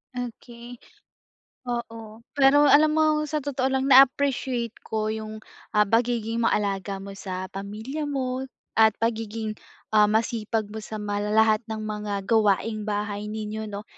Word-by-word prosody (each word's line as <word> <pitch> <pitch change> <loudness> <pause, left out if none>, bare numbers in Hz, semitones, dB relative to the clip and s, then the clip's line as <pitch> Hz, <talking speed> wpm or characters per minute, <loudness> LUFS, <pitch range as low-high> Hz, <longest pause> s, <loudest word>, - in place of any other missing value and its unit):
Okey. 240 0 -8 0.9
Oo, 230 -2 -6 0.2
pero 285 +1 +6
alam 305 +2 +6
mo 315 0 +3 0.2
sa 305 0 -2
totoo 265 -2 -1
lang 265 0 +1
na-appreciate 265 -3 +4
ko 215 -1 -2
yung, 215 0 -6 0.4
ah, 210 - +6
pagiging 230 0 +1
maalaga 200 -2 0
mo 195 0 -8
sa 185 -1 -5
pamilya 220 +10 -5
mo 260 -2 -2 0.4
at 220 -1 +5
pagiging, 225 -1 -2 0.4
ah, 210 -1 +5
masipag 220 0 0
mo 220 - -5
sa 215 0 -7
mala 205 0 -2
lahat 220 0 +5
ng 220 -1 -4
mga 210 -2 -4
gawaing 215 0 +1
bahay 205 0 -3
ninyo, 215 0 -5
'no. 205 +1 -6
220 Hz, 135 wpm, -25 LUFS, 210-245 Hz, 0.9 s, pero